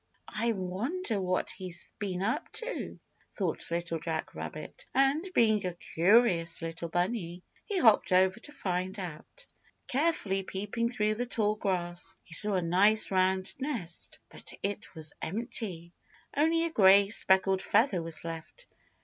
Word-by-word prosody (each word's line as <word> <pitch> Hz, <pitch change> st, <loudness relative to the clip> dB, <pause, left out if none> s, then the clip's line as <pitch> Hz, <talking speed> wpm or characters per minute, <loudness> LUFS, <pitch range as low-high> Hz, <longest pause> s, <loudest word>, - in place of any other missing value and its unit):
"I 230 Hz, +2 st, +1 dB
wonder 215 Hz, -, -2 dB
what 185 Hz, 0 st, 0 dB
he's 180 Hz, -2 st, -7 dB
been 190 Hz, -3 st, -2 dB
up 225 Hz, +3 st, -1 dB
to?" -, -, -5 dB, 0.4 s
thought 185 Hz, -6 st, -2 dB
Little 170 Hz, -1 st, -2 dB
Jack 160 Hz, 0 st, -3 dB
Rabbit, -, -, -8 dB
and, 275 Hz, +7 st, +3 dB
being 215 Hz, -3 st, +4 dB
a 180 Hz, -2 st, -3 dB
curious 175 Hz, -2 st, +2 dB
little 165 Hz, 0 st, -5 dB
bunny, 175 Hz, 0 st, -2 dB, 0.2 s
he 410 Hz, -3 st, -2 dB
hopped 225 Hz, -, +5 dB
over 185 Hz, +3 st, +4 dB
to 295 Hz, -, -11 dB
find 185 Hz, -6 st, -3 dB
out. 185 Hz, -, -8 dB, 0.4 s
Carefully 260 Hz, -, +1 dB
peeping 205 Hz, +5 st, -2 dB
through 215 Hz, -3 st, +1 dB
the 245 Hz, +3 st, -3 dB
tall 215 Hz, -3 st, +1 dB
grass 185 Hz, -2 st, -2 dB
he 165 Hz, -, -10 dB
saw 210 Hz, +3 st, +4 dB
a 180 Hz, -, +1 dB
nice 200 Hz, +6 st, +4 dB
round 185 Hz, 0 st, +1 dB
nest, 235 Hz, -, -5 dB
but -, -, -12 dB
it 205 Hz, 0 st, -4 dB
was 155 Hz, -2 st, -4 dB
empty. 190 Hz, -4 st, -3 dB, 0.4 s
Only 325 Hz, +3 st, +3 dB
a 335 Hz, -, -2 dB
gray 200 Hz, -5 st, +6 dB
speckled 190 Hz, -2 st, +3 dB
feather 210 Hz, -6 st, +2 dB
was 165 Hz, -1 st, -6 dB
left. 165 Hz, -, -8 dB
195 Hz, 145 wpm, -30 LUFS, 175-230 Hz, 0.4 s, gray